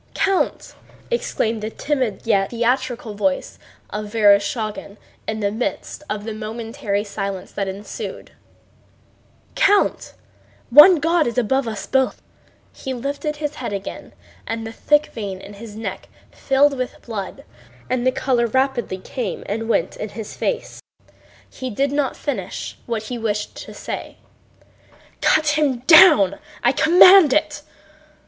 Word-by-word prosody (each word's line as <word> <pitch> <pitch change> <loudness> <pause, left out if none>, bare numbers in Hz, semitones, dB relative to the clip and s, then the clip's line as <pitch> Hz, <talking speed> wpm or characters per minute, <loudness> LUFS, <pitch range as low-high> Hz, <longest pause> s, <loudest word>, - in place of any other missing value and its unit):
"Count!" 390 -1 0 0.4
exclaimed 225 - -1
the 215 - -3
timid 255 -5 -2
yet 195 -4 +2
theatrical 240 -1 -1
voice 275 +7 -2 0.3
of 210 0 -4
Vereshchágin 210 -1 +1 0.3
in 220 0 -3
the 200 -1 0
midst 230 +6 -4
of 210 -1 -3
the 220 0 -5
momentary 220 0 -3
silence 200 -2 -5
that 200 -1 -3
ensued, 195 +2 -7 1.2
"Count! 405 0 +2 0.6
One 295 +8 +10
God 330 0 +1
is 235 - -4
above 255 +2 +1
us 215 -3 -5
both...." 265 -1 +1 0.5
He 265 -1 -5
lifted 285 +4 -3
his 295 0 -4
head 250 -7 -5
and 200 - -1
again 195 - -9 0.5
the 225 - -6
thick 295 +6 +2
vein 200 -4 -5
in 200 - -11
his 210 +1 -10
thin 220 +2 -8
neck - - -6 0.2
filled 275 +1 +2
with 255 - -4
blood 205 -5 -6 0.4
and 255 -1 -1
the 255 - +3
color 250 -2 +1
rapidly 260 -4 0
came 200 +1 -5
and 225 +2 -4
went - - 0
in 215 - -5
his 210 +1 -8
face. 485 - -3 0.7
He 260 -1 -6
did 270 +5 0
not 285 -2 -1
finish 195 -11 -4
what 230 -2 -2
he 240 +2 -5
wished 210 -2 -2
to - - -9
say. - - -6 1.0
"Cut 310 -1 +3
him 270 -5 +1
down! 310 - +7 0.2
I 240 - +5
command 355 0 +7
it..." 300 -1 0
235 Hz, 140 wpm, -21 LUFS, 210-280 Hz, 1.2 s, One